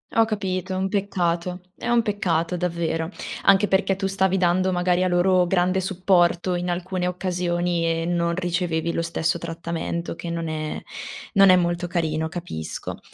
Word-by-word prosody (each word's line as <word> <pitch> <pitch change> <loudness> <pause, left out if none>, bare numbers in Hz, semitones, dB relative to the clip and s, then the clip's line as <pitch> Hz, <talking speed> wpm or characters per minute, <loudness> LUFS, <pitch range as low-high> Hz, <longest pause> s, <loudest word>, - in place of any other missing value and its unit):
Ho 225 0 +5
capito, 190 -3 -2
un 190 +1 0
peccato, 180 -3 -1
è - - -6
un 240 -1 +4
peccato 180 -5 0
davvero. 165 -2 -1 0.4
Anche 195 +1 +5
perché 195 0 +2
tu 195 +1 -3
stavi 190 0 +1
dando, 185 +1 +2
magari, 180 0 +1
a - - +2
loro 180 0 +3
grande 185 +1 +2
supporto 180 -1 +2
in 180 0 -2
alcune 180 +1 -2
occasioni 175 -1 -1
e 165 0 0
non 170 0 0
ricevevi 170 -2 -1
lo - - 0
stesso 165 0 -1
trattamento 170 0 -4
che 170 +1 -7
non 165 -1 -3
è 155 -1 -3 0.5
non 195 -2 +7
è 185 - +8
molto 175 0 0
carino, 160 -2 -1
capisco. 160 - -6
175 Hz, 160 wpm, -24 LUFS, 170-185 Hz, 0.5 s, è